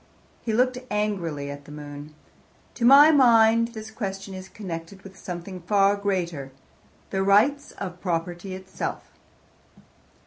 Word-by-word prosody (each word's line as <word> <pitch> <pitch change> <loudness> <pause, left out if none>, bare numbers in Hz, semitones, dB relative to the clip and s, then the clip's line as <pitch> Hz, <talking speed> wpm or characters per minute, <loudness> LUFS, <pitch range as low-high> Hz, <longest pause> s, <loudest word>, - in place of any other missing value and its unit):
He 230 - -3
looked 250 +3 +2
angrily 175 -9 -2
at 145 0 -10
the 150 - -12
moon. 145 0 -9 0.6
"To 235 - -1
my 280 +5 +9
mind 230 -4 +5
this 220 0 -8
question 195 -3 -5
is 190 0 -9
connected 185 -1 -8
with 195 0 -12
something 180 0 -7
far 200 +2 +3
greater, 175 -9 -2 0.6
the 190 - 0
rights 225 +9 +3
of 180 -2 -7
property 175 +1 -3
itself." 190 0 -6
195 Hz, 130 wpm, -25 LUFS, 170-220 Hz, 0.6 s, my